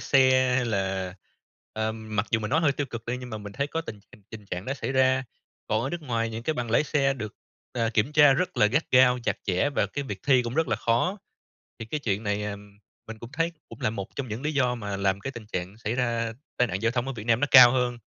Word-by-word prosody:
xe 130 Hz, -2 st, +4 dB
hay 125 Hz, -, +1 dB
là, 95 Hz, -3 st, -2 dB, 0.6 s
ờ, 110 Hz, 0 st, -1 dB
mặc 110 Hz, -2 st, -3 dB
dù 115 Hz, -, +2 dB
mình 105 Hz, -, -4 dB
nói 160 Hz, +4 st, +3 dB
hơi 145 Hz, -4 st, +3 dB
tiêu 145 Hz, 0 st, -3 dB
cực 115 Hz, -2 st, -7 dB
đi 120 Hz, +1 st, -2 dB
nhưng 125 Hz, -1 st, -8 dB
mà 110 Hz, -, -5 dB
mình 105 Hz, -1 st, -9 dB
thấy 140 Hz, +6 st, -1 dB
có 165 Hz, +3 st, -3 dB
tình 110 Hz, -10 st, -8 dB, 0.3 s
tình 110 Hz, -2 st, -9 dB
trạng 90 Hz, 0 st, -5 dB
đó 135 Hz, -, -2 dB
xảy 135 Hz, -, -4 dB
ra, 130 Hz, 0 st, +3 dB, 0.4 s
còn 110 Hz, +2 st, 0 dB
ở 135 Hz, -, -2 dB
nước 175 Hz, -1 st, -5 dB
ngoài 115 Hz, -4 st, -1 dB
những 115 Hz, +1 st, -6 dB
cái 155 Hz, +4 st, -1 dB
bằng 120 Hz, -2 st, -3 dB
lái 135 Hz, -, +3 dB
xe 140 Hz, -2 st, +1 dB
được, 110 Hz, -5 st, -6 dB, 0.4 s
ờ, 115 Hz, -2 st, 0 dB
kiểm 115 Hz, +7 st, +1 dB
tra 150 Hz, -2 st, +7 dB
rất 180 Hz, +7 st, -1 dB
là 105 Hz, -, +5 dB
gắt 140 Hz, +9 st, +1 dB
gao, 125 Hz, -1 st, +5 dB
chặt -, -, 0 dB
chẽ 100 Hz, +9 st, +1 dB
và -, -, +1 dB
cái 145 Hz, -1 st, -5 dB
việc 100 Hz, -6 st, -6 dB
thi 130 Hz, -3 st, +5 dB
cũng 120 Hz, +1 st, -5 dB
rất 160 Hz, 0 st, +1 dB
là -, -, +1 dB
khó. 150 Hz, -, 0 dB, 0.6 s
Thì 115 Hz, -, -5 dB
cái 150 Hz, +6 st, -3 dB
chuyện 105 Hz, -5 st, -1 dB
này, 105 Hz, 0 st, -1 dB
à, 105 Hz, -1 st, -4 dB, 0.5 s
mình 110 Hz, 0 st, -8 dB
cũng 120 Hz, +2 st, -10 dB
thấy 165 Hz, +2 st, 0 dB, 0.2 s
cũng 115 Hz, -, -12 dB
là -, -, +1 dB
một 100 Hz, -3 st, -5 dB
trong 135 Hz, -3 st, -4 dB
những 110 Hz, +5 st, -5 dB
lý 150 Hz, -, -1 dB
do 125 Hz, -3 st, +2 dB
mà 100 Hz, -4 st, -4 dB
làm 100 Hz, 0 st, 0 dB
cái 135 Hz, -, -4 dB
tình 115 Hz, -4 st, -9 dB
trạng 90 Hz, 0 st, -5 dB
xảy 115 Hz, 0 st, -3 dB
ra 115 Hz, -2 st, -1 dB, 0.2 s
tai 125 Hz, -1 st, +2 dB
nạn 95 Hz, +3 st, -3 dB
giao 115 Hz, +1 st, +2 dB
thông 125 Hz, +1 st, -1 dB
ở 135 Hz, -, -3 dB
Việt 110 Hz, -3 st, -8 dB
Nam 115 Hz, 0 st, +3 dB
nó 145 Hz, -, +2 dB
cao 125 Hz, -3 st, +10 dB
hơn. 125 Hz, -2 st, 0 dB
120 Hz, 270 wpm, -26 LUFS, 110-135 Hz, 0.6 s, cao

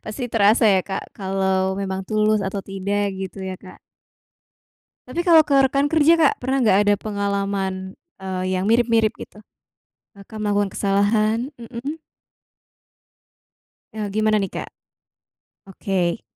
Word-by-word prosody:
Pasti 215 Hz, +4 st, -6 dB
terasa 220 Hz, +2 st, +4 dB
ya 190 Hz, -, +3 dB
Kak, 190 Hz, -, -3 dB
kalau 190 Hz, -1 st, 0 dB
memang 190 Hz, -1 st, -3 dB
tulus 215 Hz, 0 st, +2 dB
atau 195 Hz, +1 st, -3 dB
tidak 200 Hz, +1 st, -2 dB, 0.2 s
gitu 190 Hz, +1 st, -6 dB
ya, 185 Hz, -, -4 dB
Kak. 185 Hz, -, -13 dB, 1.3 s
Tapi 335 Hz, +7 st, -3 dB
kalau 335 Hz, -3 st, +6 dB
ke 280 Hz, -, +2 dB
rekan 275 Hz, +2 st, +2 dB
kerja, 320 Hz, +2 st, +4 dB
Kak, 310 Hz, -3 st, +4 dB
pernah 265 Hz, +2 st, 0 dB
nggak, 215 Hz, -5 st, +4 dB
ada 205 Hz, 0 st, +3 dB
pengalaman, 200 Hz, -2 st, -3 dB, 0.2 s
eee, 185 Hz, -1 st, -3 dB
yang 190 Hz, -, -2 dB
mirip-mirip 230 Hz, -1 st, +2 dB
gitu? 210 Hz, -, -11 dB, 0.8 s
Kakak 200 Hz, +2 st, -11 dB
melakukan 205 Hz, -1 st, 0 dB
kesalahan, 215 Hz, +6 st, +1 dB
mhm. 245 Hz, +6 st, -6 dB, 2.0 s
Eee, 215 Hz, -1 st, -3 dB
gimana 215 Hz, +1 st, +1 dB
nih, 195 Hz, -, -4 dB
Kak? -, -, -6 dB, 1.0 s
Oke. 185 Hz, 0 st, -2 dB
205 Hz, 130 wpm, -21 LUFS, 195-230 Hz, 2.0 s, kalau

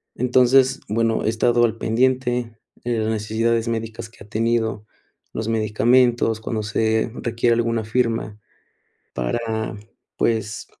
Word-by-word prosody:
Entonces, 130 Hz, +2 st, +3 dB
bueno, 115 Hz, +1 st, 0 dB
he -, -, +2 dB
estado 120 Hz, +1 st, +2 dB
al 115 Hz, -1 st, -2 dB
pendiente 125 Hz, 0 st, 0 dB, 0.3 s
de 120 Hz, -2 st, 0 dB
las 110 Hz, 0 st, -1 dB
necesidades 110 Hz, +2 st, 0 dB
médicas 115 Hz, 0 st, -4 dB
que 105 Hz, -, -15 dB
ha -, -, -17 dB
tenido, 110 Hz, -1 st, 0 dB, 0.5 s
los 110 Hz, -, -3 dB
medicamentos, 115 Hz, +1 st, +2 dB
cuando 110 Hz, -1 st, -3 dB
se 110 Hz, +2 st, 0 dB
requiere 120 Hz, 0 st, +1 dB
alguna 115 Hz, -1 st, 0 dB
firma, 115 Hz, -2 st, -1 dB, 0.8 s
para, 110 Hz, -, -2 dB, 0.4 s
pues, 110 Hz, -2 st, -1 dB
115 Hz, 120 wpm, -22 LUFS, 110-120 Hz, 0.8 s, Entonces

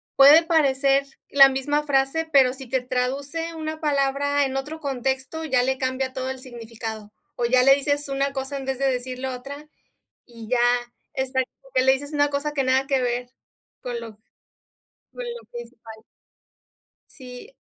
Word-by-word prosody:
puede 290 Hz, +4 st, +8 dB
parecer 275 Hz, -4 st, +2 dB, 0.2 s
la 275 Hz, -1 st, +8 dB
misma 290 Hz, +3 st, -1 dB
frase, 285 Hz, +3 st, 0 dB
pero 265 Hz, -3 st, +5 dB
si 265 Hz, -1 st, -10 dB
te 260 Hz, 0 st, 0 dB
traduce 275 Hz, +6 st, -3 dB
una 315 Hz, 0 st, -5 dB
palabra 285 Hz, -1 st, +1 dB
en 265 Hz, 0 st, -4 dB
otro 295 Hz, +4 st, -5 dB
contexto, 270 Hz, +2 st, -3 dB
ya 260 Hz, -5 st, +2 dB
le 265 Hz, +1 st, 0 dB
cambia 260 Hz, 0 st, -2 dB
todo 260 Hz, 0 st, -3 dB
el 265 Hz, 0 st, -5 dB
significado. 225 Hz, -3 st, -8 dB, 0.2 s
O 240 Hz, -, -1 dB
ya 250 Hz, +1 st, +4 dB
le 270 Hz, +1 st, +7 dB
dices 285 Hz, +1 st, -1 dB
una 275 Hz, 0 st, 0 dB
cosa 270 Hz, +1 st, -4 dB
en 270 Hz, -, -6 dB
vez 265 Hz, -1 st, -2 dB
de 275 Hz, -, -1 dB
decir 255 Hz, 0 st, -4 dB
lo 260 Hz, 0 st, -3 dB
otra, 280 Hz, +4 st, -9 dB, 0.6 s
y 230 Hz, -2 st, -11 dB
ya 250 Hz, -, +2 dB, 0.6 s
está 260 Hz, 0 st, 0 dB
como 270 Hz, +1 st, -22 dB
que 255 Hz, -, +4 dB
le 265 Hz, -, +5 dB
dices 285 Hz, +2 st, -5 dB
una 290 Hz, -1 st, +2 dB
cosa 285 Hz, +1 st, -1 dB
que 275 Hz, -2 st, 0 dB
nada 260 Hz, +1 st, +2 dB
que 270 Hz, -2 st, +2 dB
ver 245 Hz, 0 st, -2 dB, 0.5 s
con 245 Hz, -2 st, -4 dB
lo 230 Hz, -1 st, -9 dB, 1.0 s
con -, -, -7 dB
lo 475 Hz, 0 st, -8 dB
que 240 Hz, 0 st, -6 dB
es 235 Hz, +1 st, -18 dB
igual. 225 Hz, -2 st, -13 dB, 1.1 s
Sí. 250 Hz, -, -11 dB
270 Hz, 180 wpm, -23 LUFS, 255-285 Hz, 1.1 s, puede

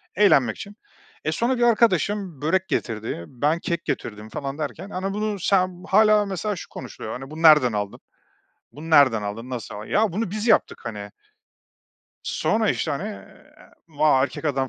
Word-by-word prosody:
eğlenmek 135 Hz, -, +4 dB
için. 200 Hz, +1 st, -9 dB, 0.5 s
E, 155 Hz, -, +1 dB
sonra 240 Hz, +9 st, 0 dB
bir 240 Hz, -, +1 dB
arkadaşım 205 Hz, -, +2 dB
börek 185 Hz, +5 st, +1 dB
getirdi, 110 Hz, -6 st, -3 dB
ben 145 Hz, +6 st, 0 dB
kek 170 Hz, 0 st, -3 dB
getirdim 105 Hz, -1 st, -4 dB
falan 140 Hz, +4 st, -5 dB
derken. 165 Hz, +5 st, -5 dB
Hani, 195 Hz, 0 st, -3 dB
bunu 210 Hz, 0 st, -2 dB
sen, 185 Hz, -1 st, +1 dB
hâlâ 210 Hz, +1 st, +5 dB
mesela 200 Hz, +2 st, -3 dB
şu -, -, -9 dB
konuşuluyor: 115 Hz, -3 st, -8 dB
“Hani, 135 Hz, +2 st, -10 dB
bunu 160 Hz, +1 st, -7 dB
nereden 150 Hz, -7 st, +6 dB
aldın?“, 105 Hz, -1 st, -3 dB, 0.7 s
“Bunu 160 Hz, +3 st, -9 dB
nereden 130 Hz, -8 st, +5 dB
aldın?“, 110 Hz, +5 st, -6 dB
“Nasıl 120 Hz, -4 st, -6 dB
a 105 Hz, +1 st, -8 dB
"Ya, 215 Hz, -2 st, +1 dB
bunu 205 Hz, +1 st, -2 dB
biz 215 Hz, +3 st, -3 dB
yaptık, -, -, +3 dB
hani. 105 Hz, -3 st, -6 dB, 1.1 s
Sonra, -, -, +1 dB
işte, -, -, -2 dB
hani, -, -, -3 dB
eee, -, -, -14 dB, 0.2 s
“Va, 150 Hz, -3 st, +3 dB
erkek 140 Hz, +3 st, -3 dB
adam 135 Hz, -3 st, 0 dB
155 Hz, 170 wpm, -23 LUFS, 125-200 Hz, 1.1 s, nereden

